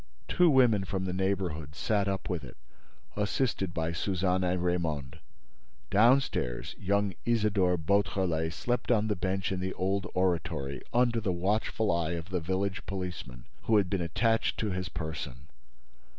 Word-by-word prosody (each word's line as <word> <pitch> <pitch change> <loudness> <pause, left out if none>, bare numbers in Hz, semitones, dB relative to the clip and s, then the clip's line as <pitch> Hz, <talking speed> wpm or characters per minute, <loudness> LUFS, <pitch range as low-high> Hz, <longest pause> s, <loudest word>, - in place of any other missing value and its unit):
Two 180 -1 +4
women 125 -8 +5
from 95 0 -3
the 90 - -2
neighborhood 90 -6 -2
sat 100 +3 +1
up 95 -1 -2
with 90 -5 -2
it, - - -11 0.6
assisted 105 -2 0
by 80 -1 -1
Suzanne 90 +1 0
and 90 0 0
Raymonde. 80 -7 -1 0.7
Downstairs, 110 - +2
young 100 0 +1
Isidore 105 -6 +2
Beautrelet 85 -2 +1
slept 120 +10 -2
on 110 -3 +3
the 105 - +1
bench 95 +1 -1
in 95 - -1
the 95 +1 -2
old 95 +1 0
oratory, 85 -6 -1
under 120 -1 +2
the 100 -3 0
watchful 105 +4 0
eye 85 -1 0
of 85 +1 -5
the 95 -1 0
village 95 +3 -2
policeman, 90 -10 -5 0.2
who 110 - +4
had 100 -2 +1
been 95 -3 0
attached 115 +7 +1
to 105 -2 -1
his 90 0 -3
person. 75 -5 -6
95 Hz, 150 wpm, -30 LUFS, 85-105 Hz, 0.7 s, women